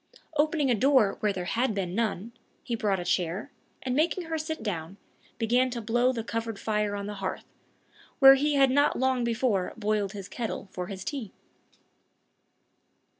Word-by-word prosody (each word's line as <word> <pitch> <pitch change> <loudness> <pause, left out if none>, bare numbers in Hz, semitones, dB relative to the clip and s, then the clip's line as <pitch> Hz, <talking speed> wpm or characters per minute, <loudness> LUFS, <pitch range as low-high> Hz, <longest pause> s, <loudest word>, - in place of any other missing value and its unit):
Opening 300 -2 +2
a - - +5
door 250 -2 +3
where 210 - +1
had 205 +5 -1
been 185 -3 -2
none, 220 0 -1 0.3
he 240 - -4
brought 205 -4 0
a 175 - -5
chair, 180 - -1 0.3
and 255 -1 -1
making 335 +5 +1
her 325 -1 -3
sit 315 -5 -4
down, 185 -3 -4 0.4
began 245 +3 +2
to 240 -1 -4
blow 240 +3 +2
the 230 -3 -4
covered 230 -1 -3
fire 210 -1 -1
on 200 0 -4
the 210 - -5
hearth, 190 - -4 0.7
where 270 -1 +10
he 290 +2 +1
had 270 -2 +5
not 285 +2 +3
long 260 -1 +1
before 230 -5 0
"boiled 210 -2 -1
his 200 -2 -7
kettle" 225 -4 -5
for 180 -1 -5
his 190 -1 -6
tea. 255 -7 -5
230 Hz, 170 wpm, -28 LUFS, 200-260 Hz, 0.7 s, where